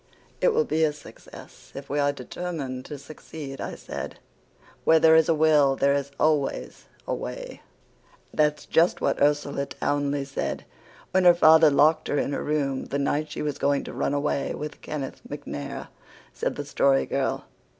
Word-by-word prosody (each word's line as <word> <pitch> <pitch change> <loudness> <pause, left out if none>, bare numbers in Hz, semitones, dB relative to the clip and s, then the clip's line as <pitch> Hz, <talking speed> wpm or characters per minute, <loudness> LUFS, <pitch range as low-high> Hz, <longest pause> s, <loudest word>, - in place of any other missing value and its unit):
"It - - +4
will 465 +1 +2
be 160 - +1
a 155 -1 +2
success 150 - -14
if 140 0 -7
we 145 - -1
are 145 0 +3
determined 140 -1 -5
to 145 - -7
succeed," 140 0 -9
I - - -5
said. - - -7 0.7
"'Where 160 - +5
there 160 0 +6
is 160 0 +4
a 165 - +4
will 150 -3 +4
there 140 +1 +2
is 140 0 -1
always 150 -3 0 0.2
a - - -1
way.'" - - -6 0.7
"That's 150 -1 +1
just 170 +2 +3
what - - 0
Ursula 145 -1 +1
Townley 145 -1 -1
said 135 - -4 0.5
when 185 0 +2
her 175 -1 +8
father 160 -1 +7
locked 155 +2 +3
her 145 - 0
in 140 - -1
her - - -2
room 140 -3 -1
the 140 - -3
night 145 +2 -1
she - - -5
was 150 -2 -3
going 140 0 +1
to - - -8
run 145 - -1
away 145 -1 -1
with 150 0 -7
Kenneth 140 -3 -6
MacNair," 70 -1 -6 0.4
said - - -2
the - - -5
Story 65 0 +2
Girl. - - -2
145 Hz, 175 wpm, -25 LUFS, 140-155 Hz, 0.7 s, her